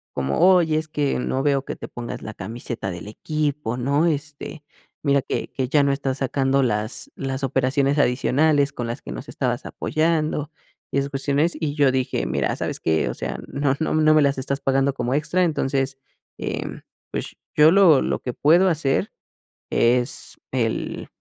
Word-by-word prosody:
como: 70 +1 -1
"Oye, 165 -4 +3
es 155 0 -2
que 145 -2 0
no 130 +1 -1
veo 140 -1 +1
que - - -5
te - - -8
pongas 120 -1 -7
la 105 - -7
camiseta 110 0 -5
del 90 +3 -7
equipo, 145 0 -2
¿no? 140 +6 +1
Este, 150 -1 -3 0.4
mira 140 -2 +2
que - - -3
que 130 -1 -2
ya 145 +3 +3
no 140 0 +2
estás 135 -1 -2
sacando 135 0 +1
las 110 -2 -1
las 135 0 -4
operaciones 135 +2 +1
adicionales 140 +2 +2
con 120 - -4
las 115 +1 -4
que - - -8
nos - - -7
estabas - - -2
apoyando". 155 -1 -1 0.4
Esas 140 0 0
cuestiones 140 +4 0
y 150 -3 -1
yo 145 -3 +3
dije: 130 - -1
"Mira, 60 - 0
¿sabes - - -3
que?, 80 -1 +1
o - - -4
sea, - - -4
no 140 -1 0
no 160 - 0
no 155 0 +5
me 155 - +5
las 140 -1 +2
estás 135 +1 -2
pagando 135 +1 +2
como 125 0 -1
extra, 150 +5 +1
entonces 135 -4 0 0.4
eh, - - -3 0.5
pues - - -5 0.2
yo 155 +1 +7
lo 175 -7 +6
lo - - -1
que 125 - -4
puedo 170 +8 +4
hacer 150 -5 0 0.6
es 125 +2 +2 0.2
el" 115 -4 -2
140 Hz, 175 wpm, -23 LUFS, 130-150 Hz, 0.6 s, yo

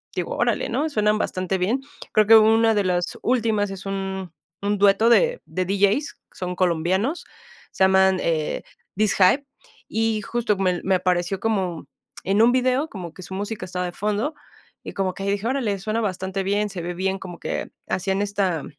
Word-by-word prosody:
digo: - - -3
"Órale", - - 0
¿no? 280 +7 0
Suenan 210 -6 +2
bastante 185 -2 -1
bien. 220 +9 0 0.3
Creo 215 - +5
que 225 - +9
hubo 220 0 +7
una 225 0 +4
de 205 -1 +1
las 180 -2 -1
últimas 220 -4 +1
es 195 0 -8
un 190 -2 -4 0.3
un 205 +1 0
dueto 200 +3 +4
de - - +3
de 185 0 -2
DJs, 200 - +1
que - - -26
son 180 -1 -4
colombianos, 185 - 0 0.5
se - - +1
llaman, 190 0 +4
eh, 155 -2 -1 0.3
DisHype, 210 +5 +3 0.4
y 225 -1 0
justo 235 0 -1
me 185 -2 +1
me 190 0 +2
apareció 180 0 0
como 190 -7 -1 0.4
en 195 +3 +2
un 240 +2 +5
video 255 +3 +2
como 180 - -8
que 185 - -11
su 190 - -8
música 205 0 -4
estaba 180 0 -3
de 175 - -4
fondo, 210 - -2 0.5
y - - -7
como 190 -1 -1
que 195 - -5
dije: 200 +1 -1
"Órale, 240 -6 0
suena 215 +4 -2
bastante 190 -2 -2
bien, 205 +2 0
se 190 -3 -6
ve 175 +1 -4
bien", 190 +2 -2
como 175 -3 -9
que - - -4 0.2
hacían 190 +1 0
esta 195 -6 -1
195 Hz, 185 wpm, -23 LUFS, 185-220 Hz, 0.5 s, que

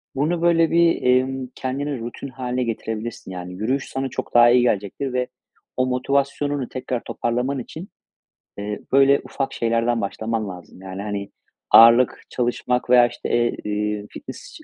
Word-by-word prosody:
bunu 160 +5 0
böyle 165 -1 +3
bir, 170 0 +3
emm, 130 +1 +1
kendine 135 +1 -3
rutin 120 +4 -6
hâline 125 -1 -3
getirebilirsin. 115 -3 -5
Yani, 90 0 -7
yürüyüş 125 +9 -2
sana 135 0 -3
çok - - -6
daha 120 0 +7
iyi 125 0 +5
gelecektir 120 +4 -1
ve 125 0 0 0.5
o 130 - +2
motivasyonunu 140 +1 -1
tekrar 125 -2 -4
toparlaman 125 +4 -2
için, 160 +9 -8 0.7
eee, 105 +1 -4
böyle 140 +1 +5
ufak 135 -1 -4
şeylerden 115 0 0
başlaman 110 +2 -3
lazım. 90 0 -11
Yani, 95 0 -7
hani, 100 -1 -4 0.4
ağırlık 115 +2 +7
çalışmak 125 0 -1
veya, 125 -1 +7
işte, 120 0 -7
eee, 120 0 +1
iii, 105 0 -2
fitness - - -10
125 Hz, 150 wpm, -22 LUFS, 110-135 Hz, 0.7 s, daha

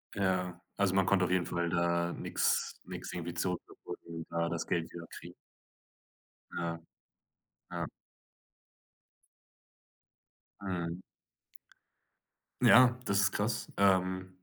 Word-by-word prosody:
Ja, 90 -2 0 0.2
also 100 -2 +2
man 95 -1 +3
konnte 95 -2 +4
auf 90 - -2
jeden 90 -1 +2
Fall 85 -1 -1
da 85 0 +1
nix - - 0
nix - - -6
irgendwie 85 -1 -4
zurückverfolgen, 85 -2 -5
da 85 0 0
das 85 0 -3
Geld 85 -2 -1
wieder 85 -1 -8
kriegen. - - -10 1.2
Ja, 85 -1 -3 0.9
ja. - - -2 2.8
Mhm. 90 -2 -3 1.6
Ja, 125 0 +7
das 100 -3 +2
ist 100 0 +4
krass, 110 +2 -1
ähm. 95 -1 +3
90 Hz, 105 wpm, -32 LUFS, 85-95 Hz, 2.8 s, Ja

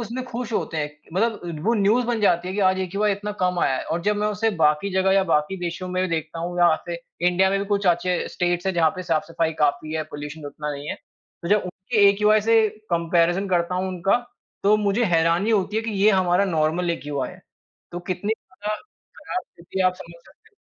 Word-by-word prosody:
उसमें 235 +3 -4
खुश 240 -1 -5
होते 165 - -2
हैं। 150 -1 -2 0.2
मतलब 185 -7 -1
वो 235 - +4
न्यूज 220 +4 +3
बन 235 -2 0
जाती 180 -3 +2
है 190 - -4
कि 205 - -1
आज 190 0 +3
एक्यूआई 200 +3 0
इतना 205 +1 -4
कम 180 -1 +1
आया 130 - +2
है। - - -4
और 165 - -2
जब 210 +2 +1
मैं 210 - 0
उसे 210 +2 0
बाकी 150 +6 +3
जगह 190 0 +3
या 195 0 +4
बाकी 160 +2 +1
देशों 175 +1 -4
में 185 0 -1
भी 185 - 0
देखता 160 0 -3
हूँ 175 +1 -4
या 170 -2 +6
फिर 170 0 -4 0.3
इंडिया 190 +2 +3
में 195 - +1
भी - - -2
कुछ 200 -1 0
अच्छे 175 +1 +2
स्टेट्स 175 +1 -1
हैं 190 - +2
जहाँ 160 -2 +4
पे 185 - -4
साफ-सफाई 165 -1 -1
काफ़ी 150 +1 +1
है, 160 - 0
पॉल्यूशन 150 0 -8
उतना 150 +1 -5
नहीं 145 +1 -7
है, - - -2
तो 170 - -13
जब 210 0 +3
उनके 200 +3 +2
एक्यूआई 210 +2 +4
से 225 0 +4 0.2
कम्पैरिजन 170 +3 +2
करता 175 0 +1
हूँ 185 +1 -1
उनका, 185 +3 +1 0.5
तो 205 +2 +5
मुझे 210 +3 +1
हैरानी 165 +6 +2
होती 210 -1 +1
है 220 - +1
कि 225 - -3
ये 215 - +7
हमारा 185 0 +3
नॉर्मल 170 0 0
एक्यूआई 145 -3 -3
है। - - -14 0.5
तो 175 - -4
कितनी 185 +4 -1 0.2
ज़्यादा 210 +1 -3 0.4
खराब 365 - -4
स्थिति 175 +3 -7
है 185 - +4
आप 185 - +2
समझ 170 -2 -13
सकते 440 - -22
हो। 410 - -39
185 Hz, 225 wpm, -23 LUFS, 170-205 Hz, 0.5 s, ये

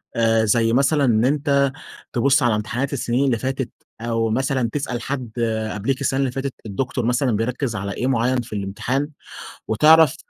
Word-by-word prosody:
آآ، 115 -1 +3
زي 115 +1 +2
مثلًا 140 +2 +3
إن 115 -2 +3
أنت 140 -1 +2 0.4
تبُص 135 +3 +3
على 120 -3 +3
امتحانات 120 +6 -2
السنين 130 0 0
اللي 125 -4 +2
فاتت، 130 +1 -3 0.3
أو 115 -1 0
مثلًا 130 +1 0
تسأل 130 -4 -3
حد 130 -3 -4 0.4
قبليك 125 +7 -2
السنة 135 -1 0
اللي 135 -2 +1
فاتت 135 +1 -3
الدكتور 120 +3 -2
مثلًا 125 +2 +1
بيركز 120 +2 -2
على 100 0 -3
إيه 125 - -2
معين 125 0 +1
في 120 - -10
الامتحان؟ 110 +8 -2 0.6
وتعرف 155 +7 +5
125 Hz, 165 wpm, -21 LUFS, 115-135 Hz, 0.6 s, وتعرف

